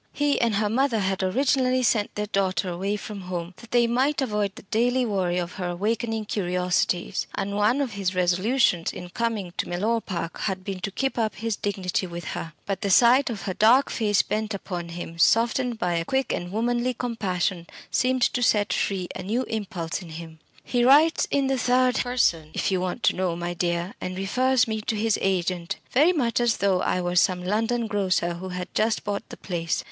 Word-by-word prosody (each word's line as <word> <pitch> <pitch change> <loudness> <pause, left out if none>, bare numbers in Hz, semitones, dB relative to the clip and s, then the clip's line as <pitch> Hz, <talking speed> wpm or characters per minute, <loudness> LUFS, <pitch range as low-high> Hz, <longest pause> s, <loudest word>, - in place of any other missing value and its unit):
He 290 -1 +1
and 230 -3 +2
her 210 +1 +1
mother 245 +2 +1
had 190 -1 -1
originally 255 +5 +2
sent 215 -3 +1
their 210 - -1
daughter 195 -2 0
away 190 +4 -2
from 205 -1 -7
home 180 -1 -5
that 235 - -14
they 240 0 +4
might 260 +5 +1
avoid 210 -6 -1
the - - -11
daily 245 +5 +1
worry 185 -5 0
of 175 -1 -2
her 180 - -1
awakening 220 +4 -1
curiosities, 180 -1 0
and 200 0 -2
one 215 +7 +2
of 265 -4 -1
his 195 -2 -2
resolutions 185 +1 +2
in 180 - -8
coming 215 -4 -2
to - - -2
Mellor 215 +6 0
Park 170 -4 -5
had 190 -2 -2
been 195 -1 -4
to 185 - -3
keep 270 +5 -2
up 220 -3 0
his 225 +1 -2
dignity 190 -2 -2
with 170 0 -7
her. 165 - -5
But 195 -1 -3
the 200 - -1
sight 245 +7 +5
of 210 -6 -5
her 190 - -2
dark 235 +8 +4
face 210 -3 +2
bent 215 0 -2
upon 175 -3 -5
him, 170 -1 -7
softened 235 +5 +3
by 180 -4 -1
a 165 0 -1
quick 265 +5 0
and 175 0 -4
womanly 240 +3 0
compassion, 190 -7 -2 0.2
seemed 255 0 +2
to 245 - +1
set 210 -3 +2
free 190 -3 -1
a - - -5
new 225 +7 -1
impulse 195 -7 -4
in 175 - -10
him. 160 0 -9 0.2
"He 245 -1 0
writes 295 +6 +5
in 280 -1 +1
the 265 -1 0
third 250 +1 +3
person, 170 -11 +1
if - - 0
you 185 -1 +1
want 185 +6 -3
to - - +3
know, 180 -2 -1
my 175 0 -3
dear, 175 +1 -1
and 185 0 -4
refers 250 +5 +2
me 220 -1 -2
to 220 - -2
his 215 0 +1
agent, 180 -2 -1 0.2
very 300 +7 +5
much 250 -10 0
as 240 -1 +2
though 195 -2 +2
I 180 - 0
were 175 0 -2
some 180 0 +3
London 225 +4 0
grocer 190 -5 0
who 185 +2 -7
had 180 0 -6
just 220 +1 +1
bought 205 -1 -4
the - - -9
place. 165 -3 -2
205 Hz, 205 wpm, -25 LUFS, 180-235 Hz, 0.2 s, sight